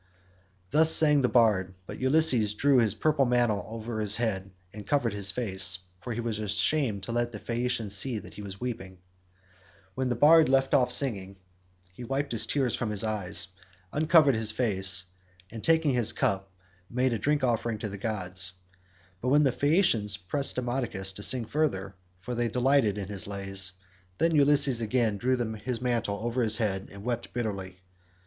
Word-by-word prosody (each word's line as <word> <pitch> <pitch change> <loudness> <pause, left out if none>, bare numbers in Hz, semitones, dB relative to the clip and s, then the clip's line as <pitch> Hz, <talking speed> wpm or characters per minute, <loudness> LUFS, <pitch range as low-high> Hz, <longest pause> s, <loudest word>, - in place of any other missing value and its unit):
Thus 160 +1 +5
sang 150 -3 +6
the 125 - +1
bard, 100 -6 +2
but - - -9
Ulysses 130 -6 +2
drew 135 +3 +3
his 110 -3 +1
purple 150 +2 +1
mantle 120 -4 +1
over 115 0 -6
his 105 -1 +3
head 100 -5 -2 0.2
and 105 -1 -10
covered 130 -7 0
his 100 -1 +1
face, 95 -3 +1 0.2
for 90 - -7
he 120 - -4
was 115 -2 -3
ashamed 105 +1 0
to 115 - -4
let 120 0 -1
the 110 - -7
Phaeacians 115 -2 -2
see 120 +4 +1
that - - -10
he 105 - -10
was 100 -1 -9
weeping. 100 -7 -6 1.0
When 130 +3 -2
the 120 - -1
bard 155 +4 +5
left 135 0 +2
off 125 -2 +3
singing 100 -8 +1 0.6
he 120 - -10
wiped 135 +4 -3
the 115 - -3
tears 125 +2 -1
from 120 - -2
his 105 0 -2
eyes, 100 -4 -2 0.4
uncovered 155 -2 +4
his 110 -1 0
face, 95 -6 +1 0.5
and, 115 -1 -9
taking 160 -2 +2
his 120 -3 +2
cup, 95 -2 -2 0.4
made 125 +1 0
a 115 - -2
drink 145 +5 0
offering 115 -2 -1
to 105 0 -5
the 100 0 -8
gods; 95 -3 0 0.7
but 125 - -1
when 145 +3 +4
the 135 - +2
Phaeacians 125 - +2
pressed 120 +9 -1
Demodocus 120 -6 -3
to 100 - -6
sing 120 +2 +2
further, 105 -9 -2 0.3
for 125 - -6
they 120 0 -1
delighted 125 -4 +1
in 100 -2 -5
his 100 -2 -5
lays, 95 -1 +1 0.4
then 165 +6 +1
Ulysses 140 -4 +3
again 115 -2 0
drew 130 +5 0 0.2
his 115 +3 -4
mantle 115 -5 -1
over 120 +2 -1
his 110 -2 +2
head 100 -4 -2
and 100 0 -11
wept 120 0 -4
bitterly. 95 -6 -5
115 Hz, 180 wpm, -27 LUFS, 100-130 Hz, 1.0 s, sang